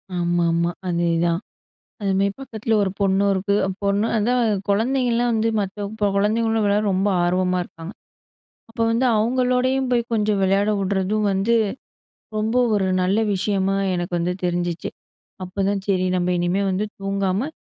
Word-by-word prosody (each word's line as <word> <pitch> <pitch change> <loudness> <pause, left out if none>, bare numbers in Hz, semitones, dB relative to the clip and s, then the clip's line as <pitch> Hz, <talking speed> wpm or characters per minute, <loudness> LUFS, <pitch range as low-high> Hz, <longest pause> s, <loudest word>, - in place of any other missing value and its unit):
ஆமாமா, 170 -1 +1 0.2
அதேதான், 170 -1 +1 0.6
அது 195 -1 0
மாதிரி 200 0 +1
பக்கத்தில 225 -4 -2
ஒரு 195 - 0
பொண்ணும் 200 0 +2
இருக்கு, 200 +1 0 0.3
பொண்ணு 200 +2 +1
அதான் 220 -2 +1
கொழந்தைங்கலாம் 240 +2 +1
வந்து 225 +1 +1
மற்ற 200 +1 -3 0.3
கொழந்தைங்களோட 225 +2 +1
விளையாட 205 +1 +2
ரொம்ப 195 +2 +1 0.2
ஆர்வமா 180 +1 +1
இருக்காங்க. 165 +2 -10 0.8
அப்போ 230 0 -3
வந்து 235 +3 +2
அவங்களோடையும் 255 +3 +1
போய் 240 -1 +2
கொஞ்சம் 210 -2 +1
விளையாடவுடுறதும் 200 +1 +1
வந்து 195 +5 +1 0.8
ரொம்ப 220 +3 -1 0.2
ஒரு 195 -2 +1
நல்ல 190 +4 +2
விஷயமா 195 0 0 0.2
எனக்கு 175 0 -3
வந்து 175 +1 -1
தெரிஞ்சுச்சு. 175 -1 -2 0.5
அப்போதான் 195 +1 -1
"சரி 185 -2 +1
நம்ம 180 0 0
இனிமேல் 180 +3 0
வந்து 200 +3 -1
தூங்காம, 195 +6 -1
200 Hz, 130 wpm, -22 LUFS, 185-220 Hz, 0.8 s, பொண்ணும்